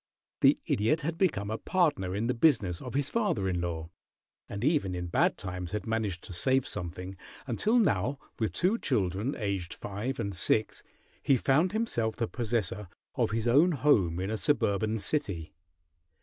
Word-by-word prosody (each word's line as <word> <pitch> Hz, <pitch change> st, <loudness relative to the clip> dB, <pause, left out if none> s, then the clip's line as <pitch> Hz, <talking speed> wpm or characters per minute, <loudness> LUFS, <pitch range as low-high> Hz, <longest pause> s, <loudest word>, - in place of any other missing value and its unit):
The -, -, +5 dB
Idiot 150 Hz, +10 st, +1 dB
had 165 Hz, +3 st, -2 dB
become 110 Hz, -, 0 dB
a 110 Hz, -, -3 dB
partner 145 Hz, -, +1 dB
in 105 Hz, +3 st, -1 dB
the 125 Hz, -, +1 dB
business 115 Hz, -, +2 dB
of 125 Hz, 0 st, -7 dB
his 140 Hz, 0 st, +1 dB
father 205 Hz, -, 0 dB
in 90 Hz, -2 st, -1 dB
law, 85 Hz, -1 st, -4 dB, 0.6 s
and 100 Hz, +2 st, -5 dB
even 140 Hz, -, +1 dB
in 90 Hz, 0 st, -3 dB
bad 85 Hz, -, +1 dB
times 90 Hz, -2 st, -5 dB
had 105 Hz, -2 st, -3 dB
managed 110 Hz, -6 st, -2 dB
to 95 Hz, -, -8 dB
save 130 Hz, +9 st, +2 dB
something, 90 Hz, +1 st, -5 dB, 0.3 s
until 210 Hz, -, +1 dB
now, 140 Hz, -, +2 dB, 0.2 s
with 110 Hz, -5 st, 0 dB
two 185 Hz, -, +1 dB
children, 105 Hz, +1 st, 0 dB
aged 100 Hz, -5 st, -3 dB
five 110 Hz, +7 st, -4 dB
and 100 Hz, 0 st, -2 dB
six, 110 Hz, +5 st, +1 dB, 0.4 s
he 135 Hz, -, +3 dB
found 145 Hz, +9 st, +2 dB
himself 120 Hz, -, 0 dB
the 115 Hz, -, -1 dB
possessor 105 Hz, -5 st, -2 dB, 0.3 s
of -, -, +1 dB
his 110 Hz, +2 st, -1 dB
own 150 Hz, +9 st, +5 dB
home 110 Hz, -, +2 dB
in 95 Hz, +3 st, -2 dB
a 110 Hz, -, -1 dB
suburban 110 Hz, -5 st, +1 dB
city. 100 Hz, -, -2 dB
110 Hz, 170 wpm, -29 LUFS, 95-140 Hz, 0.6 s, The